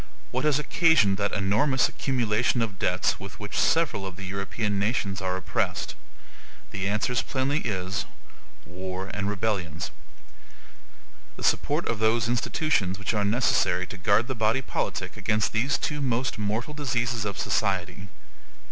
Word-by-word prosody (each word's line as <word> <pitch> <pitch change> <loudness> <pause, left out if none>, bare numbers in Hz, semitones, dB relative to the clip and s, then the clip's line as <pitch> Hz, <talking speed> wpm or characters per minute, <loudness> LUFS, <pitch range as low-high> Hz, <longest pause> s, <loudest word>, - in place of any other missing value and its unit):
What 130 +3 -1
has 150 -3 +4
occasioned 150 - +4
that 100 0 0
enormous 110 +8 +2
accumulation 120 -2 +1
of 100 -4 -5
debts 90 +2 +1
with 100 +1 -9
which 105 -1 -6
several 160 -11 +2
of 95 -2 -5
the 95 +1 -7
European 100 +2 -2
nations 100 -3 0
are 95 -1 -1
oppressed? 95 - -1 0.8
The 100 0 -2
answers 110 +4 +1
plainly 140 +2 0
is, 95 -6 -2 0.6
wars 95 +1 -5
and 100 -1 -1
rebellions; 95 -6 -2 1.4
the - - -9
support - - +1
of 115 - -1
those 110 0 +2
institutions 115 - +1
which 100 +2 -2
are 105 -1 +1
necessary 100 -4 +2
to 100 - -9
guard 100 +5 +3
the 130 - -1
body 110 +3 +1
politic - - -3
against 105 0 +1
these 125 +6 +2
two 150 -1 -2
most 125 -3 0
mortal 110 +7 -2
diseases 120 -5 -1
of 100 -2 -3
society. 95 -1 -1
105 Hz, 145 wpm, -27 LUFS, 95-125 Hz, 1.4 s, has